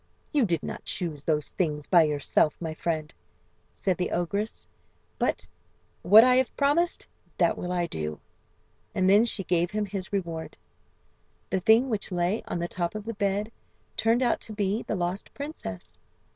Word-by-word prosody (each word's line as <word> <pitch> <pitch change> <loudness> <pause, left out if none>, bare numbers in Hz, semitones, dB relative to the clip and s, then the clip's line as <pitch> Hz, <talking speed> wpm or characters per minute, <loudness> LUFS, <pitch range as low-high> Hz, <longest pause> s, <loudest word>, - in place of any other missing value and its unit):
"You 285 -5 +4
did 170 -5 -1
not - - -6
choose 160 -6 -2
those 150 -2 0
things 150 -5 -1
by 175 -2 +6
yourself, 150 0 +1
my 160 -2 -4
friend," 155 -2 -3 0.6
said 185 -3 -1
the 180 - -1
ogress; 200 +5 -2 0.5
"but - - 0 0.5
what 215 +5 +8
I 255 0 +5
have 260 -1 0
promised, 300 +5 +2 0.3
that - - +3
will 180 - -4
I 175 -1 +1
do." 75 - -4 0.8
And 185 0 +2
then 205 +4 +6
she 215 -4 -1
gave 175 -1 +1
him 210 +1 -1
his 195 -2 -5
reward. 170 -5 -4 0.9
"The 190 - +1
thing 225 +7 +5
which 210 -3 -2
lay 180 +4 0
on - - -2
the 170 0 -2
top 175 +1 -3
of 215 -1 -5
the 230 - -3
bed" 200 +1 -1 0.4
turned 230 +3 +2
out 240 - +2
to 220 - -6
be 205 +1 0
the - - -1
lost 180 +1 -3
princess. 95 - -7
185 Hz, 170 wpm, -27 LUFS, 170-215 Hz, 0.9 s, what